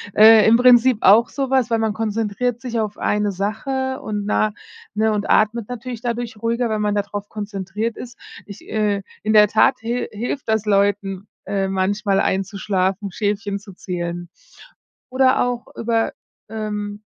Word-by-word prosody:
äh, 220 0 +8
im 225 +1 +6
Prinzip 250 -1 +5
auch 215 +5 +6
so 270 -2 -3
was, 260 -3 +2
weil 230 -1 +1
man 220 -1 0
konzentriert 225 +2 -2
sich 235 -1 -4
auf 210 -1 -4
eine 210 0 0
Sache 260 +7 -3
und 205 -1 -4
nach 215 +1 +1 0.4
ne, 215 +1 +1
und 210 -1 -2
atmet 215 +1 +2
natürlich 245 -1 -6
dadurch 235 -2 -4
ruhiger, 235 +1 0
wenn 215 -1 -1
man 210 0 0
da 205 - +1
drauf 205 0 -7
konzentriert 210 +1 -4
ist. 245 0 -9 0.3
Ich, 200 - -12
äh 210 -2 0 0.2
in 215 - 0
der 210 -1 +7
Tat 220 +5 +3
hil 235 +2 -3
hilft 235 +3 -4
das 220 -1 +1
Leuten, 200 -1 0 0.2
äh, 195 0 -1
manchmal 195 +1 0
einzuschlafen, 195 0 -1
Schäfchen 205 0 -2
zu 200 0 -13
zählen. 175 -1 -5 0.8
Oder 260 0 +3
auch 245 -1 -4
über, 225 0 0 0.4
ähm 210 -1 -5
215 Hz, 160 wpm, -20 LUFS, 200-230 Hz, 0.8 s, äh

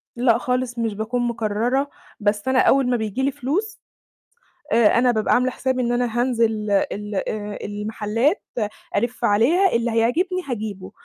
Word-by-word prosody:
لأ 235 -1 +3
خالص 250 -1 -2
مش 225 -2 -1
باكون 220 +4 -2
مقررة، 235 +5 0 0.3
بس 205 +2 0
أنا 260 -1 +3
أول 270 -2 +4
ما 245 - +2
بييجي 220 +3 -3
لي 275 - +2
فلوس 310 - -3 0.9
آآ، 230 -1 +4
أنا 250 0 +4
بابقى 215 -2 +1
عاملة 255 +1 +2
حسابي 260 0 -1
إن 240 0 0
أنا 240 -1 0
هانزل 225 -4 0
ال 205 +1 -1
آآ 210 +1 -3
المحلات 215 - -1 0.5
ألِف 240 +3 -1
عليها 290 - +3
اللي 235 0 +1
هيعجبني 335 +12 +1
هاجيبه، 205 -5 -5
235 Hz, 150 wpm, -22 LUFS, 215-255 Hz, 0.9 s, أول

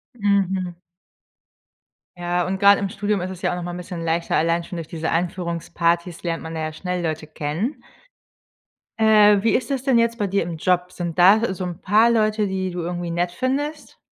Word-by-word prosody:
Mhm. 190 -4 0 1.4
Ja 175 0 -1
und 190 +1 -2
grad 200 0 +7
im 200 -1 -2
Studium 205 -2 -1
ist 185 +1 -4
es 185 - -9
ja - - 0
auch - - -2
noch 175 - -5
mal 175 - -4
'n - - -6
bisschen 180 -1 -6
leichter, 165 +1 0
allein 170 +1 +1
schon 175 - -8
durch 165 -2 -6
diese 160 -1 -3
Einführungsparties 170 0 -1
lernt 165 -2 -3
man 160 0 -7
da 160 - -3
ja 155 0 -3
schnell 180 +1 -3
Leute 155 -1 -3
kennen. 155 - -3 1.2
Äh. 210 -2 +6
Wie 225 - +2
ist 245 +2 -1
es 265 -2 -1
denn 260 -3 +3
jetzt 230 0 +2
bei 205 - 0
dir 195 -1 0
im 165 -1 -5
Job? 180 +2 +1
Sind 170 -2 -5
da 195 +3 +5
so 185 - -5
'n 175 0 -6
paar 220 +4 +4
Leute, 215 -2 +2
die 190 -1 -2
du 175 - -5
irgendwie 175 0 -4
nett 175 +1 -1
findest? 290 - -3
180 Hz, 205 wpm, -22 LUFS, 170-205 Hz, 1.4 s, grad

